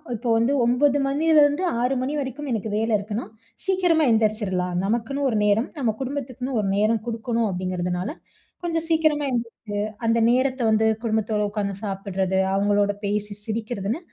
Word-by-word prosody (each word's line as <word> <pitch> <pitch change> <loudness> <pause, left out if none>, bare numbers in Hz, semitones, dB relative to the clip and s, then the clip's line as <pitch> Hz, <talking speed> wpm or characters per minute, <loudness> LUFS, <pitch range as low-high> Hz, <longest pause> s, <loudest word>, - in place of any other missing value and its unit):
இப்போ 235 +2 -3
வந்து 230 +4 +2
9 270 +4 +3
மணில 310 +3 +3
இருந்து, 290 +5 +2 0.2
6 255 +2 +1
மணி 265 +3 -2
வரைக்கும் 275 +2 -5
எனக்கு 220 -1 -2
வேல 225 +1 0
இருக்குன்னா, 210 +3 -4 0.4
சீக்கிரமா 360 -4 +3
எந்திரிச்சிரலாம். 210 -5 +1
நமக்குனு 235 +6 -1
ஒரு 220 - 0
நேரம், 210 +5 +2
நம்ம 245 -6 +1
குடும்பத்துக்குனு 260 -1 -4
ஒரு 195 - -2
நேரம் 215 +1 +2
குடுக்கணும், 230 -1 -1
அப்டிங்கறதுனால 180 +1 -2 0.5
கொஞ்சம் 330 -1 -1
சீக்கிரமா 310 -2 +2
எந்திரிச்சு 235 -1 -2 0.5
அந்த 230 +1 +3
நேரத்த 260 0 +1
வந்து 220 0 +3 0.2
குடும்பத்தோட 220 -1 0
உட்காந்து 205 -2 -2
சாப்ட்றது, 190 -1 -1
அவங்களோட 205 +1 +2
பேசி 210 0 -2
சிரிக்கிறதுன்னு, 220 - -3
230 Hz, 145 wpm, -24 LUFS, 205-270 Hz, 0.5 s, 9